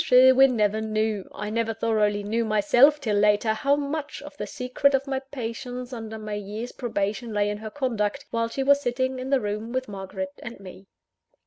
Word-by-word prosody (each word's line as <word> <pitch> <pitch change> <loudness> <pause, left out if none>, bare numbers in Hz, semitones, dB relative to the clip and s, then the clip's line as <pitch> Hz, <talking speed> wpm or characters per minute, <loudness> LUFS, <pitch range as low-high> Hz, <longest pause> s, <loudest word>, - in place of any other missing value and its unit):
Sherwin 260 +1 +6
never 215 0 +1
knew, 215 -2 -1
I 210 +1 -5
never 225 0 -1
thoroughly 210 -2 +1
knew 225 +3 0
myself 230 +7 +4
till 215 -7 0
later, 210 +1 +3
how 275 +6 +2
much 290 +1 -4
of - - -10
the - - -5
secret 270 +1 +1
of 270 0 -1
my 270 -1 -1
patience 250 -1 -6
under 220 -2 -6
my 215 -1 -6
year's 210 +4 -5
probation 215 -1 -3
lay 205 0 +1
in 210 - -5
her 220 0 -6
conduct, 240 -1 -2
while 230 0 0
she 270 +3 -2
was 280 +1 +4
sitting 260 0 -1
in 255 +1 -5
the 275 -1 +3
room 215 +1 -4
with 260 +1 -2
Margaret 190 -1 -6
and 235 -2 -8
me. 190 0 -12
225 Hz, 195 wpm, -25 LUFS, 210-260 Hz, -, Sherwin